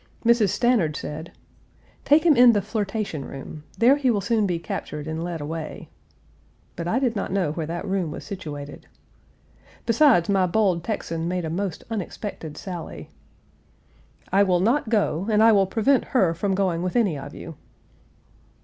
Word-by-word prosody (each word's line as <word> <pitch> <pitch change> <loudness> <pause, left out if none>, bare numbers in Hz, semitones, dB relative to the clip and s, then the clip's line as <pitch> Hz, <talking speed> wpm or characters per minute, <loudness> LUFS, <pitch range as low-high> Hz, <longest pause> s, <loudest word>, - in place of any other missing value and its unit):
Mrs. 230 -3 +4
Stanard 215 -10 +2
said: 155 +3 -6 0.7
"Take 305 +3 +4
him 320 -4 +6
in 245 -1 +7
the 205 - +2
flirtation 205 - -3
room; 145 +3 -9
there 250 +5 +5
he 275 -3 +1
will 220 -4 +2
soon 215 0 +1
be 175 -2 -1
captured 150 -2 -5
and 160 +1 -4
led 170 -1 -4
away," 160 +1 -6 0.9
but 170 - -4
I 220 - +1
did 255 -3 0
not 200 - -3
know 185 -6 0
where 160 0 -4
that 170 +1 -4
room 190 -4 -1
was 150 - -7
situated. 150 -8 -8 1.0
Besides, 230 - +4
my 195 -2 +2
bold 185 -3 +1
Texan 165 -5 -3
made 180 -1 -2
a 160 - -3
most 185 -1 -3
unexpected 195 -6 -5
sally: 175 -4 -7 1.2
"I 195 +2 +4
will 185 -3 +3
not 235 +6 +1
go, 200 -4 0
and 215 0 +4
I 225 - +7
will 195 -3 +4
prevent 240 +7 +2
her 190 -10 +2
from 195 +3 -1
going 185 -3 0
with 180 0 -3
any 210 -9 +2
of 140 +1 -8
you." 165 - -8
190 Hz, 165 wpm, -24 LUFS, 165-220 Hz, 1.2 s, in